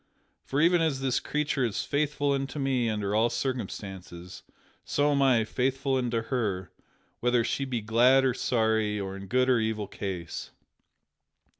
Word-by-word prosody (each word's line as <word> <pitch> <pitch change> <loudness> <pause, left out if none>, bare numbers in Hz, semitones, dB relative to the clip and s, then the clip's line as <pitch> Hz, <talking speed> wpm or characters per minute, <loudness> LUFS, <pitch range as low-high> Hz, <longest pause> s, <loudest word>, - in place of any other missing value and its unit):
For 135 - -2
even 170 +1 +4
as 155 -5 +1
this 130 -2 +1
creature 145 -2 -1
is 115 -4 -1
faithful 145 0 0
unto 135 +1 -2
me 130 -4 +1
under 105 -2 -2
all 110 +2 +3
circumstances, 95 -8 -5 0.4
so 145 +1 +1
am 140 -1 +2
I 125 -5 +4
faithful 135 +3 0
unto 120 -3 -1
her 105 -8 -2 0.5
whether 120 -1 +2
she 135 +4 -1
be 125 -4 -2
glad 125 +5 +4
or 130 - +2
sorry, 110 -4 +1
or 95 -1 -4
in 100 0 -8
good 130 +6 +2
or 125 -2 +4
evil 110 -1 -1
case. 95 -4 -5
125 Hz, 155 wpm, -28 LUFS, 105-135 Hz, 0.5 s, even